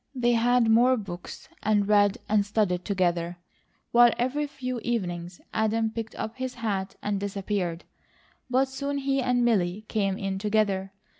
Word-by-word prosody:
They 240 -1 +2
had 240 0 +3
more 245 +3 +5
books 185 -5 -8
and 205 -1 +2
read 205 -1 +4
and 210 -1 +3
studied 200 -4 0
together, 175 -3 0 0.5
while 240 0 +7
every 275 +5 0
few 255 -3 -4
evenings 175 -7 -3
Adam 220 0 +1
picked 225 0 -6
up 220 +2 -5
his 260 -1 -4
hat 200 -5 -3
and 205 -1 -1
disappeared, 195 -3 -2 0.7
but 260 +2 +3
soon 280 +2 -3
he 275 0 0
and 245 -1 +2
Milly 205 -2 +1
came 195 -3 0
in 195 -3 -3
together. 200 -2 0
215 Hz, 150 wpm, -27 LUFS, 195-240 Hz, 0.7 s, while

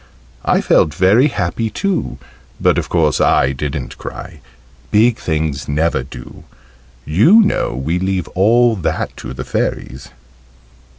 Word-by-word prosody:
I - - +2
felt 75 -3 +2
very 105 - +4
happy 115 - -2
too, 195 - -2 0.4
but - - +2
of - - -5
course - - +1
I 65 - +3
didn't 70 +1 -5
cry: - - -9 0.5
"big 110 +2 +3
things" 75 -4 -3
never 80 +3 0
do, 60 - -11 0.6
you 110 - +5
know 195 - -1
we 80 +7 -2
leave 95 -1 -2
all 115 +5 +3
that 90 - -3
to 65 +1 -8
the - - -5
Fairies. 65 +1 -4
90 Hz, 130 wpm, -17 LUFS, 75-115 Hz, 0.6 s, you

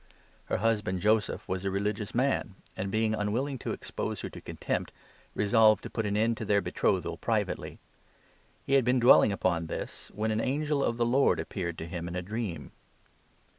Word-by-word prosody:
Her - - -1
husband, 105 -3 +1
19 90 - -4
Joseph, 105 0 +1
was 95 0 -2
a 100 - 0
religious 100 +2 -2
man 125 -6 0 0.2
and, 95 +1 -3
being 110 +1 +1
unwilling 120 +6 -1
to - - -3
expose - - -4
her - - -5
to - - -10
contempt, - - -3 0.4
resolved 110 0 +4
to - - -7
put 110 -2 -1
an 105 0 0
end 115 +1 +2
to 110 - -4
their 100 0 +3
betrothal 100 - 0
privately. - - -2 0.9
He 135 - -1
had 135 -1 +5
been 125 +2 +3
dwelling 120 -3 +7
upon 85 -4 0
this, - - -6
when 110 +2 0
an 110 - 0
20 130 - 0
angel 150 0 0
of 115 - 0
the 120 - +2
Lord 130 +4 +3
appeared 85 -4 -4
to - - -5
him 85 -1 -5
in 85 - -5
a 90 - -2
dream. 95 - -4
110 Hz, 195 wpm, -29 LUFS, 95-115 Hz, 0.9 s, dwelling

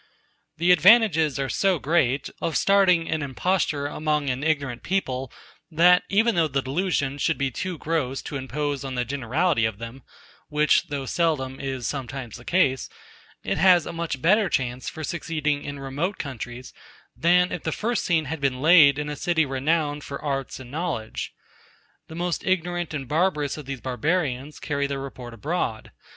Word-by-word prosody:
The 170 +3 +3
advantages 180 - +5
are 135 -1 -1
so 190 +5 +1
great, 140 -3 +1
of 165 - 0
starting 185 -4 +4
an 155 -1 -1
imposture 145 +1 0
among 150 -1 -1
an 130 +3 -4
ignorant 140 -6 -1
people, 135 -9 -2 0.4
that, 175 +2 +5
even 225 +4 +3
though 165 -4 +2
the 135 -2 -1
delusion 145 -2 -1
should 160 +3 +1
be 135 -1 -1
too 185 +7 -4
gross 145 -5 -2
to 150 - -6
impose 140 +1 -3
on 135 -1 -5
the 125 0 -1
generality 140 +3 0
of 110 -2 0
them 115 +4 -8 0.5
(which, 150 +1 +3
though 140 -2 -4
seldom, 135 -4 -1
is 135 -3 -4
sometimes 130 -2 -5
the 120 - -15
case) 135 -9 +1 0.5
it - - -1
has 180 -2 +6
a - - -6
much 165 -6 -4
better 200 +3 +4
chance 125 -1 -2
for 160 - -8
succeeding 150 -3 -2
in 145 0 -6
remote 145 +9 -3
countries, 125 -2 -7 0.4
than 180 +2 +3
if 180 - -4
the 160 - -2
first 230 +6 -1
scene 165 -3 +1
had 155 +2 -5
been 135 -2 0
laid 150 -2 +7
in 150 0 -3
a 150 - -4
city 160 +1 +1
renowned 145 +2 0
for 140 - -6
arts 135 -3 -3
and 125 -1 -11
knowledge. 155 -8 -3 0.8
The 160 - -10
most 175 0 -2
ignorant 175 -3 -1
and 135 -3 -5
barbarous 150 -2 0
of 150 -3 -9
these 135 -3 -5
barbarians 140 +1 -2
carry 140 -2 -1
the 140 0 -3
report 130 -3 -8
abroad. 120 - -3
150 Hz, 170 wpm, -24 LUFS, 135-170 Hz, 0.8 s, laid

